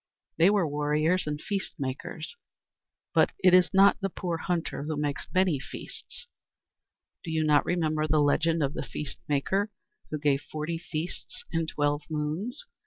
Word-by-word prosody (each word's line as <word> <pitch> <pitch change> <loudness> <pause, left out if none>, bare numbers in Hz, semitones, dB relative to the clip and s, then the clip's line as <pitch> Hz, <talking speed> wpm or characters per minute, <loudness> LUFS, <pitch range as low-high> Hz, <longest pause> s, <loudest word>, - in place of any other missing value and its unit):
"They 170 +4 +6
were 200 -5 +3
warriors 150 +4 +1
and 150 0 -2
feast 200 +3 -3
makers. 140 - -5 0.8
But - - +4
it 185 -1 +7
is 180 0 +6
not 195 +1 +6
the 195 - 0
poor 175 -2 -3
hunter 170 -2 -2
who 155 -1 -2
makes 145 -1 -2
many 185 -6 +3
feasts. - - -9 1.0
Do 170 - -6
you 160 -1 +1
not 150 -1 +4
remember 155 -3 +1
the 155 0 +3
'Legend 160 +2 +3
of 140 +1 0
the - - -3
Feast 150 - -6
Maker,' 190 +8 +1 0.4
who 155 - -2
gave 145 -2 +2
forty 155 +2 -4
feasts 170 0 -5
in 165 -1 0
twelve 145 -1 0
moons? 160 - -3
155 Hz, 160 wpm, -28 LUFS, 150-180 Hz, 1.0 s, it